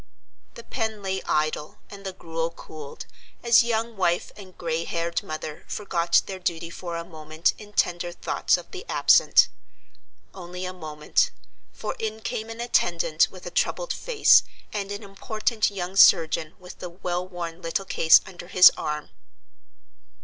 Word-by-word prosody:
The 235 - -10
pen 220 -4 -3
lay 190 0 -2
idle, 155 0 -1
and 200 -1 -10
the 190 - -4
gruel 165 -2 -4
cooled, 155 -3 -10 0.4
as 235 -1 +6
young 230 -1 -1
wife 175 -3 0
and 190 -3 -13
gray 165 -1 -2
haired 170 0 -2
mother 155 -1 -6
forgot 170 -4 +1
their 190 -1 -6
duty 170 -2 -3
for 170 -1 -6
a 170 - -5
moment 155 -1 -1
in 210 -1 -12
tender 175 -3 0
thoughts 175 - 0
of - - -12
the 385 0 -7
absent. - - +5 0.9
Only 180 0 -7
a 185 - -5
moment, 155 - 0 0.4
for - - -5
in 220 0 -4
came 220 +1 -4
an 225 0 -8
attendant 170 -9 +2
with 185 -1 -13
a 175 - -6
troubled - - 0
face, 480 -4 +5 0.3
and 200 -1 -3
an 205 +2 -5
important 215 +2 -1
young 190 -2 -5
surgeon 160 -3 +5
with 180 -1 -12
the 180 - -6
well 180 0 -4
worn 175 -2 -6
little 170 +3 -2
case 160 -3 +6
under 180 -2 -10
his 185 0 +8
arm. 150 0 -4
180 Hz, 155 wpm, -25 LUFS, 165-205 Hz, 0.9 s, his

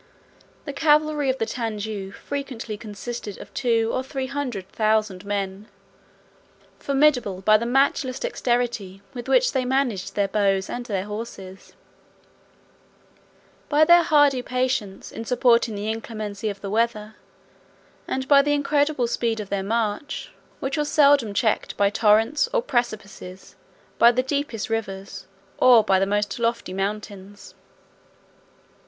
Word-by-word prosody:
The 285 - -5
cavalry 300 -1 +2
of 260 - 0
the 225 - -1
Tanjou 215 -4 -4
frequently 255 -3 -6
consisted 210 0 -7
of - - -12
two 230 -3 +1
or - - 0
three 265 0 -4
hundred 260 -8 -4
thousand 215 -3 0
men, 200 0 -3 1.1
formidable 270 -9 +1
by 215 +2 +5
the 235 +2 -3
matchless 260 0 +1
dexterity 240 - -2
with 240 -1 -7
which - - +3
they 260 -2 0
managed 250 -7 -1
their 200 -1 +1
bows 195 -1 0
and 245 0 -5
their 195 -3 -2
horses: 205 -3 -8 2.0
by 300 +1 +5
their 345 +2 +7
hardy 290 -5 +3
patience 250 -6 -2
in 225 - -6
supporting 235 -2 +2
the 205 +1 -4
inclemency 215 -2 -5
of 200 -1 -7
the 195 - -5
weather; 220 -1 -1 0.9
and 260 0 -3
by 280 -1 +7
the 290 +1 +1
incredible 290 -2 +1
speed 230 -1 -1
of 205 -2 -6
their 200 -1 -1
march, 220 +6 -2 0.3
which 270 +3 -3
was 295 0 -1
seldom 285 -7 +4
checked 220 -1 0
by 200 0 +3
torrents, 220 +6 +3
or - - +1
precipices, 215 - -4 0.4
by 235 - +8
the 255 +1 0
deepest 265 -6 -2
rivers, 195 -4 -5 0.3
or 245 -3 +7
by 190 -2 +3
the 195 - +1
most 205 +1 -1
lofty 230 -4 -1
mountains. 200 0 -5
230 Hz, 135 wpm, -23 LUFS, 205-265 Hz, 2.0 s, by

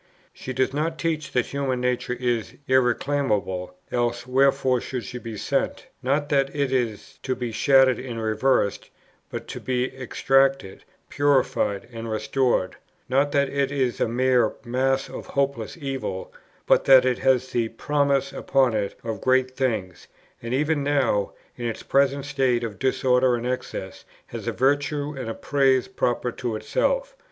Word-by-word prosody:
She 130 - -7
does 130 +1 0
not 160 +3 -1
teach 155 -4 -2
that 125 -3 +1
human 135 -2 -2
nature 125 0 -1
is 120 -3 -1
irreclaimable, 120 -8 +1 0.2
else 120 0 -1
wherefore 130 -1 +2
should 125 -3 -4
she 125 - -7
be 115 -3 -7
sent? - - -1 0.2
not, 140 +3 0
that 135 -2 +2
it 140 -2 0
is 120 -5 -2
to 130 -1 -2
be 120 -2 -4
shattered 135 +2 +4
and 120 -3 -5
reversed, 110 -1 +1 0.4
but - - -6
to - - -5
be 130 0 -2
extricated, 135 -4 +1 0.2
purified, 130 -7 +1
and 115 0 -6
restored; 110 -2 0 0.3
not, 140 +2 +2
that 140 -1 +3
it 140 -1 0
is 130 -4 -1
a - - +3
mere 125 -1 +2
mass 130 +2 0
of - - -8
hopeless 140 -2 -2
evil, 135 - -4 0.3
but - - +3
that 130 -1 +7
it 125 -1 +1
has 130 -1 +2
the 115 -2 0
promise 140 +2 0
upon 130 -3 +2
it 105 -2 -2
of 110 -3 -4
great 130 0 +2
things, 110 - -2 0.3
and 115 - -6
even 150 +2 +1
now, 135 -8 +1 0.2
in 120 - -6
its 115 - -5
present 140 0 +2
state 130 -4 +1
of 110 -3 -5
disorder 130 -1 +2
and 120 0 -4
excess, 125 0 -4 0.2
has - - -8
a - - +1
virtue 145 +2 0
and 130 -4 -5
a 115 - -4
praise 135 -3 +2
proper 120 0 -1
to 120 -2 -4
itself. - - -1
130 Hz, 160 wpm, -24 LUFS, 120-140 Hz, 0.4 s, that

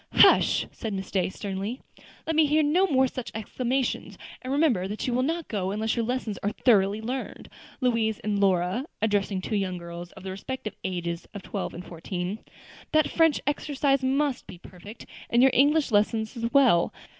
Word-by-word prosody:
"Hush!" - - +5
said 220 -3 -5
Miss 190 -1 -6
Day 185 -2 +1
sternly; 200 +5 -5 0.5
"let 320 - -1
me 310 -1 +5
hear 305 +2 +3
no 350 +7 +3
more 265 -5 +3
such 255 -1 -6
exclamations; 250 +4 -2 0.2
and 255 - -5
remember 270 - +2
that 210 +2 -4
you 250 - -1
will 250 - +2
not 325 +4 -1
go 190 -4 -2
unless 215 +2 -1
your 235 - 0
lessons 235 -3 -3
are 205 - 0
thoroughly 205 -4 +3
learned. 250 +4 -5 0.3
Louise 230 -4 +1
and 205 -1 -1
Lora," 190 +5 +1
addressing 205 -3 0
two 215 - -3
young 190 -3 -1
girls 170 0 -8
of - - -13
the 190 - -5
respective 215 +3 -5
ages 170 -2 -3
of 200 - -7
twelve 200 - -4
and 175 - -8
fourteen, 180 +4 -5 0.5
"that 310 0 +3
French 325 -3 +3
exercise 285 -1 +1
must 270 0 0
be - - -10
perfect, 185 +5 -12 0.2
and 240 +2 +4
your 265 - +6
English 290 +1 +3
lessons 220 +2 +1
as 230 0 -3
well. 255 -12 +4
220 Hz, 180 wpm, -26 LUFS, 195-265 Hz, 0.5 s, your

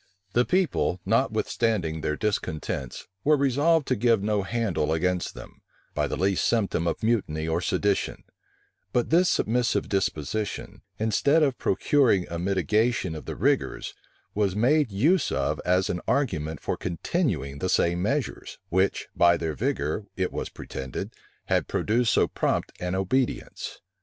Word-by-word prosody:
The 120 +1 +3
people, 180 - +1
notwithstanding 90 -9 0
their 75 0 -1
discontents, 80 - -3 0.2
were 150 +1 +4
resolved 145 +3 +2
to 130 - +3
give 115 -2 +2
no 105 -1 +1
handle 95 -7 -1
against 90 +2 -1
them, - - -12 0.3
by - - 0
the - - -3
least 95 0 +1
symptom 100 -7 +1
of 85 - -2
mutiny 85 -9 0
or 80 +2 0
sedition: 100 +1 0 0.7
but 120 +3 +1
this 175 +2 +5
submissive 120 +2 +1
disposition, 100 +1 -2 0.2
instead 140 +9 +3
of 135 -4 0
procuring 100 -2 +2
a 85 - -3
mitigation 100 +2 +1
of 80 - -7
the - - -5
rigors, - - 0 0.4
was 100 -3 0
made 130 +3 +3
use 150 - +2
of - - -1
as 90 +1 +2
an 90 - -2
argument 80 - -1
for - - -2
continuing 85 - -2
the 95 - -1
same 85 0 +2
measures, 135 +7 -2
which, 95 +2 +1
by 85 0 +5
their 80 -2 -2
vigor, 75 +7 -2
it 95 -1 0
was - - -4
pretended, 65 -1 -6 0.3
had - - +1
produced 115 +2 +1
so - - +3
prompt - - -1
an 90 +1 -2
obedience. 120 +7 -2
100 Hz, 145 wpm, -26 LUFS, 85-125 Hz, 0.7 s, this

